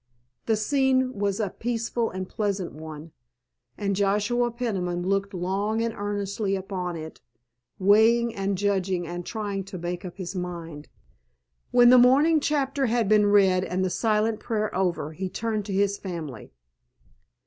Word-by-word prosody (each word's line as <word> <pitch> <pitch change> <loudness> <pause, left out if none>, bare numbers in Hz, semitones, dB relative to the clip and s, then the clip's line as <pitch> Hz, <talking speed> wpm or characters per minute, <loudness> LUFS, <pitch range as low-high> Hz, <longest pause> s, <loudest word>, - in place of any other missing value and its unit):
The 225 - +3
scene 260 +3 +1
was 200 -2 -1
a 205 -4 -1
peaceful 235 0 -2
and 185 0 -5
pleasant 200 -3 -2
one, 155 +1 -9 0.7
and 200 -1 -1
Joshua 210 +5 +1
Peniman 190 -8 -2
looked 195 +1 0
long 200 +5 -1
and 230 -1 -1
earnestly 205 -1 -2
upon 185 -2 -4
it, 160 -1 -8 0.6
weighing 225 +4 +4
and 195 -2 -2
judging 190 -3 0
and 175 +1 -5
trying 205 -1 -4
to 195 - -7
make 175 0 -4
up 180 -1 -8
his 185 -1 -5
mind. 170 -4 -6 0.8
When 245 0 +6
the 250 - +8
morning 285 +6 +5
chapter 280 -2 0
had 230 -2 +1
been 210 0 +4
read 190 -3 +4
and 185 0 -1
the 185 - -1
silent 215 0 +1
prayer 215 -3 -2
over, 180 -5 -1
he 185 +3 -4
turned 215 0 -2
to 205 - -5
his 200 +1 +1
family. 160 - -7
200 Hz, 150 wpm, -26 LUFS, 185-225 Hz, 0.8 s, the